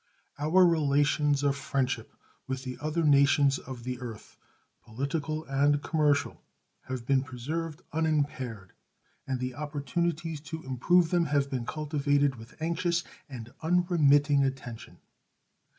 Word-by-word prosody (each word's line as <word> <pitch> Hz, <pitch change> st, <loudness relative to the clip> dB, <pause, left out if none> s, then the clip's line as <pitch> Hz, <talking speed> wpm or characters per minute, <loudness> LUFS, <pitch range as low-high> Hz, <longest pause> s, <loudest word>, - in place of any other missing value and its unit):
Our 170 Hz, +5 st, +5 dB
relations 145 Hz, -2 st, +2 dB
of 140 Hz, -1 st, +2 dB
friendship 135 Hz, -4 st, -2 dB, 0.4 s
with 130 Hz, 0 st, -3 dB
the 130 Hz, -1 st, -5 dB
other 155 Hz, +2 st, -1 dB
nations 140 Hz, -1 st, +4 dB
of 125 Hz, -2 st, -9 dB
the 125 Hz, 0 st, -4 dB
earth, 115 Hz, -3 st, -8 dB, 0.5 s
political 145 Hz, +6 st, -3 dB
and 140 Hz, +2 st, +2 dB
commercial, 150 Hz, -3 st, +1 dB, 0.4 s
have 130 Hz, -2 st, -5 dB
been 135 Hz, 0 st, +3 dB
preserved 150 Hz, +6 st, -5 dB
unimpaired, 140 Hz, -, -1 dB, 0.6 s
and 130 Hz, -1 st, -1 dB
the 125 Hz, 0 st, -3 dB
opportunities 150 Hz, +3 st, -2 dB
to 160 Hz, +1 st, -7 dB
improve 160 Hz, +7 st, +2 dB
them 175 Hz, -2 st, +3 dB
have 140 Hz, -2 st, 0 dB
been 125 Hz, -2 st, -3 dB
cultivated 145 Hz, -3 st, 0 dB
with 115 Hz, +5 st, -14 dB
anxious 170 Hz, +1 st, 0 dB, 0.3 s
and 120 Hz, -3 st, -9 dB
unremitting 155 Hz, -5 st, +3 dB
attention. 130 Hz, -4 st, -5 dB
145 Hz, 120 wpm, -29 LUFS, 130-155 Hz, 0.6 s, Our